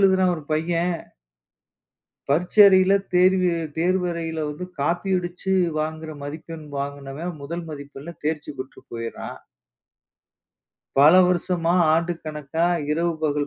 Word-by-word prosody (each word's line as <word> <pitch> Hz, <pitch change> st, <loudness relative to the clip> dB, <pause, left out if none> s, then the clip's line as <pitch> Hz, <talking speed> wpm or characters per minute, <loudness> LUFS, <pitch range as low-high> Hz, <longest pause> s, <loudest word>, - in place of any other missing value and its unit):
எழுதுறான் 190 Hz, -2 st, +4 dB
ஒரு 155 Hz, -, -8 dB
பையன்! 170 Hz, +2 st, 0 dB, 1.3 s
பரீட்சை 175 Hz, +8 st, +2 dB
அறையில 190 Hz, 0 st, +5 dB, 0.2 s
தேர்வி 185 Hz, 0 st, +4 dB
தேர்வு 165 Hz, -2 st, -2 dB
தேர்வறையில 170 Hz, -3 st, 0 dB
வந்து 150 Hz, +5 st, -5 dB, 0.2 s
காப்பி 175 Hz, +6 st, 0 dB
அடிச்சு 180 Hz, +2 st, -4 dB, 0.3 s
வாங்குற 155 Hz, +1 st, -3 dB
மதிப்பெண் 155 Hz, +1 st, -8 dB
வாங்கினவன் 140 Hz, +4 st, -5 dB
முதல் 170 Hz, +4 st, -5 dB
மதிப்பெண்ல 145 Hz, +2 st, -8 dB
தேர்ச்சி 150 Hz, -1 st, -2 dB
பெற்று 130 Hz, +1 st, -8 dB
போயிர்றான். 115 Hz, 0 st, -6 dB, 1.6 s
பல 145 Hz, +4 st, +8 dB
வருஷமா, 175 Hz, -1 st, +1 dB, 0.2 s
ஆண்டு 165 Hz, +2 st, +1 dB
கணக்கா 155 Hz, +1 st, -2 dB, 0.3 s
இரவு 170 Hz, +2 st, +1 dB
பகல் 145 Hz, -2 st, 0 dB
165 Hz, 110 wpm, -23 LUFS, 150-180 Hz, 1.6 s, பல